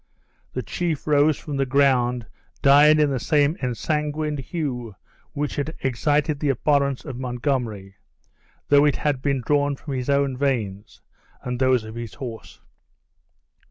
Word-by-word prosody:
The - - -3
chief 170 -5 -3
rose 150 0 +3
from 145 -2 -5
the 135 - +1
ground 125 -3 +2 0.4
dyed 150 +2 +7
in 150 -2 +3
the 130 - -1
same 145 +4 +2
ensanguined 150 +3 -2
hue 125 - -4 0.4
which 145 +1 -3
had 150 +3 -3
excited 145 +3 0
the 150 - 0
abhorrence 140 0 +1
of 125 -2 -6
Montgomery, 120 -6 -3 0.7
though 145 0 +6
it 145 - +3
had 145 -4 -1
been 140 -2 0
drawn 145 0 +2
from 140 +1 -7
his 130 0 -3
own 140 -1 +2
veins, 115 -7 -3 0.4
and 125 -1 -4
those 130 -3 +3
of 110 0 -9
his 115 -1 -7
horse. 120 -5 -8
140 Hz, 145 wpm, -23 LUFS, 125-145 Hz, 0.7 s, dyed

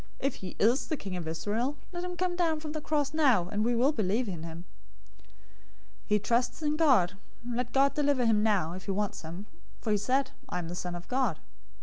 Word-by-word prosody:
If 275 - -1
he 185 -2 -7
is 235 +7 +3
the 310 - -1
King 195 -6 -5
of 175 -3 -4
Israel, 210 - -1
let 350 -1 -4
him 360 0 -4
come 360 -1 0
down 330 -3 +1
from 305 -1 -6
the 310 0 -4
cross 295 -1 0
now, 260 - +4
and 210 +2 0
we 240 +1 +2
will 255 +5 +4
believe 220 -1 0
in 175 -5 -4
him. 165 +1 -8 0.5
027:043 - - -25 0.8
He 210 - +4
trusts 235 +8 0
in 300 0 +1
God. 260 - +4 0.3
Let 245 0 -2
God 275 +1 +4
deliver 285 -4 +2
him 220 -2 +4
now, 200 -7 +2
if 185 +1 -8
he - - -7
wants 205 +1 -1
him; 170 +5 -7 0.3
for 220 - -2
he 210 - +4
said, 260 +6 +1 0.2
'I - - -2
am 170 -2 -4
the - - -4
Son 180 0 -4
of 175 0 -8
God.'" 250 - +1
230 Hz, 225 wpm, -30 LUFS, 185-285 Hz, 0.8 s, now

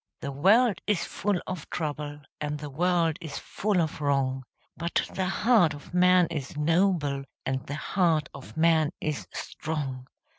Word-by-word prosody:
The 140 - -3
world 195 - +4
is 210 -5 +1
full 200 -2 -1
of 180 -5 -6
trouble, 150 -2 -4 0.2
And 150 0 -2
the 150 -1 -7
world 170 +1 +2
is 155 -4 -6
full 205 -2 -1
of 160 -3 -1
wrong, 135 -2 +1 0.3
But 170 +1 -1
the 190 -1 -1
heart 195 -5 +3
of 145 - -13
man 180 0 +5
is 145 -3 -5
noble, 155 -3 +2 0.2
And 130 0 -2
the 145 - -3
heart 165 -1 +1
of 140 +3 -11
man 160 -2 +4
is 150 -1 -3
strong! 135 -5 -4
160 Hz, 155 wpm, -27 LUFS, 145-180 Hz, 0.3 s, man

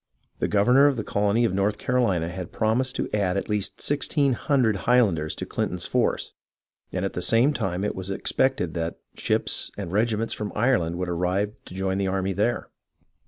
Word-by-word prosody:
The - - +1
governor 125 +8 +5
of 140 -3 +1
the 110 - -2
colony 105 +4 +1
of 95 - 0
North 100 +2 +1
Carolina 100 -10 +1
had 90 0 -6
prom 110 +2 +1
ised 130 -1 -1
to - - -2
add 100 -3 +1
at 100 - -3
least 105 -2 -2
sixteen 145 -1 +1
hundred 120 -5 +1
Highlanders 100 -11 +3
to - - -5
Clin - - -1
ton's - - -4
forces, - - 0 0.6
and 95 +1 -2
at 95 - -3
the 90 - -3
same 120 +9 +3
time 95 -6 -2
it 105 - -1
was 95 0 -6
expected 95 -2 0
that 85 -1 -3 0.2
ships - - 0
and 85 - -5
regiments 110 +2 0
from 105 -1 -4
Ireland 105 -8 +1
would 90 0 -2
arrive 90 +4 0
to - - -11
join 95 0 -1
the 100 - 0
army 95 0 -1
there. 105 +6 -1
100 Hz, 195 wpm, -25 LUFS, 95-120 Hz, 0.6 s, governor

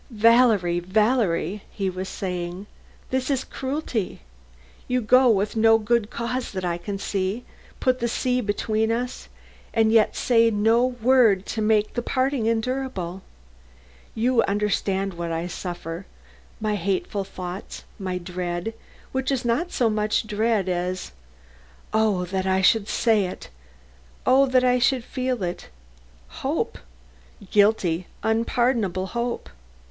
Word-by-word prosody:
"Valerie, 225 -6 +4
Valerie," 205 -1 +1
he 195 -2 -3
was 185 +1 -4
saying, 180 0 -4 0.5
"this 260 +1 0
is 270 -2 +1
cruelty. 265 -6 -3 0.7
You 250 0 +1
go 255 +2 +5
with 210 -1 +1
no 225 0 +5
good 225 0 +1
cause 235 +1 -3
that 185 -1 -3
I 170 -1 -1
can 195 +3 -4
see 195 +4 -2 0.3
put 255 -1 +1
the 235 - 0
sea 250 +2 0
between 220 +1 0
us, 245 +2 -3 0.5
and 220 -1 +4
yet 220 -2 +4
say 230 -2 +4
no 225 +3 +3
word 245 -5 +3
to 220 - -2
make 215 0 +2
the 240 - -1
parting 260 -1 0
endurable. 225 -6 -2 0.9
You 235 +2 +3
understand 195 -1 0
what 170 -1 -4
I 165 +1 -2
suffer 175 0 -6 0.5
my 215 -1 -1
hateful 195 +2 -1
thoughts, 185 0 -7 0.2
my 185 -2 -2
dread, 180 +3 -4 0.4
which 265 +1 -1
is 260 -3 -1
not 300 +10 0
so 240 - +2
much 215 0 0
dread 215 -2 0
as 180 0 -2 0.8
Oh, 215 -4 +2
that 190 +1 -2
I 190 0 +2
should 215 +1 +4
say 220 -5 +2
it! 180 - -8 0.7
Oh, 270 +2 +5
that 255 -1 +3
I 250 0 +3
should 250 0 +2
feel 255 -4 -2
it! 175 0 -4 0.6
hope; - - -3 0.7
guilty, 200 -5 +3 0.2
unpardonable 225 -4 +1
hope. 235 +4 -3
215 Hz, 130 wpm, -24 LUFS, 190-245 Hz, 0.9 s, go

